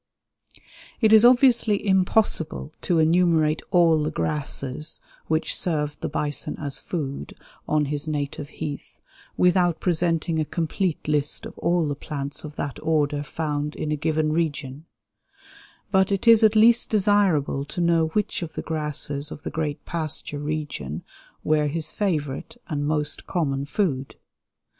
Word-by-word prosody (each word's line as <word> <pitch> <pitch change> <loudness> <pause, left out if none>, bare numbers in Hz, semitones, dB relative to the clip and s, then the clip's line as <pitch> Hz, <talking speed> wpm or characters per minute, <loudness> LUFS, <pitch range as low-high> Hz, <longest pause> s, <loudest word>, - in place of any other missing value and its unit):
It 220 -2 +4
is 220 0 +8
obviously 240 -4 +5
impossible 190 -5 +1
to 175 - +1
enumerate 160 -1 +3
all 170 -4 +4
the 150 - 0
grasses 150 0 -3 0.3
which 160 +1 0
served 150 -4 -1
the - - -2
bison 150 -1 -3
as 140 -2 -4
food 140 - -5 0.3
on 150 -1 +2
his 145 +1 -3
native 145 -1 -3
heath 150 -3 -7 0.4
without 180 -2 +3
presenting 165 -2 0
a - - +2
complete 170 +2 -2
list 150 -1 0
of - - -9
all 170 -2 +1
the 145 - -1
plants 140 -1 -5
of 150 -1 -8
that 140 - -4
order 150 -2 +1
found 150 0 -3
in 155 - -3
a - - +2
given 155 +1 0
region; 150 -3 -2 1.1
but 190 0 +3
it 195 +3 -1
is 230 -1 +7
at 220 0 +5
least 230 +2 +5
desirable 195 -10 +2
to 175 - -6
know 170 -2 +3
which 205 +5 -1
of 165 -2 -5
the - - -5
grasses 150 -2 -2
of 150 - -9
the - - -4
great 150 -2 -3
pasture 155 -3 -3
region 145 - -4 0.4
were 150 -1 +2
his 155 +1 -2
favorite 160 - -2
and 145 -3 -2
most 150 -1 -1
common 140 -6 -1
food. 145 -6 -1
155 Hz, 145 wpm, -24 LUFS, 145-175 Hz, 1.1 s, is